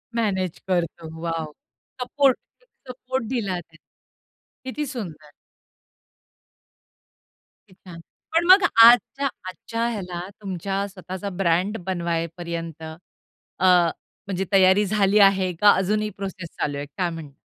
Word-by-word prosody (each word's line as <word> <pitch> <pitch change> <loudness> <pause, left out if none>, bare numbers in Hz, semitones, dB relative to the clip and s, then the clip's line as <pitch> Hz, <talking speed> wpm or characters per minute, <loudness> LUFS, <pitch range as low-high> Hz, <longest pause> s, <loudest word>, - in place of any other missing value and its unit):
Manage 190 -6 -1
करतो. 170 -3 -2
Wow! 165 -2 -3 0.5
Support, 265 +1 +2 0.3
एक - - -31 0.2
support 255 0 -4
दिला 205 -8 -2
त्याने. 160 -2 -18 0.8
किती 295 +3 -3
सुंदर. 170 - -7 2.4
किती 190 - -20 0.2
छान. 170 -1 -9 0.4
पण 335 - +3
मग 380 +1 +8 0.2
आजच्या 245 +4 +5 0.2
आजच्या 230 +5 -3
ह्याला 180 -6 -5 0.2
तुमच्या 195 +1 -3
स्वतःचा 190 0 -7
ब्रँड 185 +4 +1
बनवाय 170 -3 -1
पर्यंत 165 -2 -6
अ, 160 +3 -9 0.6
म्हणजे 195 -1 -2
तयारी 195 +1 +5
झाली 205 0 +2
आहे 195 -2 +4
का 205 - +8
अजूनही 210 +3 0
प्रोसेस 190 -4 -6
चालू 145 -1 -2
आहे 145 - -4
काय 175 +5 -3
म्हणणार? 165 -4 -8
190 Hz, 115 wpm, -23 LUFS, 170-215 Hz, 2.4 s, मग